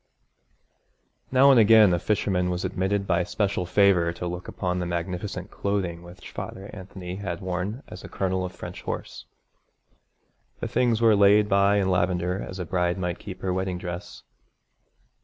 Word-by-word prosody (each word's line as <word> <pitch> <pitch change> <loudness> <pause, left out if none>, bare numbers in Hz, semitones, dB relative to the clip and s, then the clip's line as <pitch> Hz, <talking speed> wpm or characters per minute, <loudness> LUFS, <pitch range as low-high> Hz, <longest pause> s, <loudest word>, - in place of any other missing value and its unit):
Now 135 +2 +6
and 130 - +6
again 110 -3 +7
a 85 - +1
fisherman 90 -2 0
was 90 0 -2
admitted 100 +2 -1
by 90 -1 +1
special 100 -1 -1
favour 90 -2 +4
to 90 - -6
look 90 +1 -5
upon 90 -1 -2
the 90 - -2
magnificent 90 +3 -4
clothing 95 -4 -2
which 90 +1 -12
Father 95 +2 -7
Anthony 95 -2 -8
had 95 -4 -4
worn 95 +7 -4
as 90 - -10
a - - -9
colonel 95 -1 -1
of 90 - -4
French - - -9
Horse. - - -6 1.3
The - - -3
things 120 -2 +1
were 115 -2 +6
laid 105 +1 +5
by 100 0 +3
in 95 -2 +2
lavender 90 +1 0
as 95 - -7
a 90 - -4
bride 90 +1 0
might 90 -2 -3
keep 95 -3 -9
her 95 -1 0
wedding 95 -1 -2
dress. 90 +1 -7
95 Hz, 165 wpm, -25 LUFS, 90-100 Hz, 1.3 s, again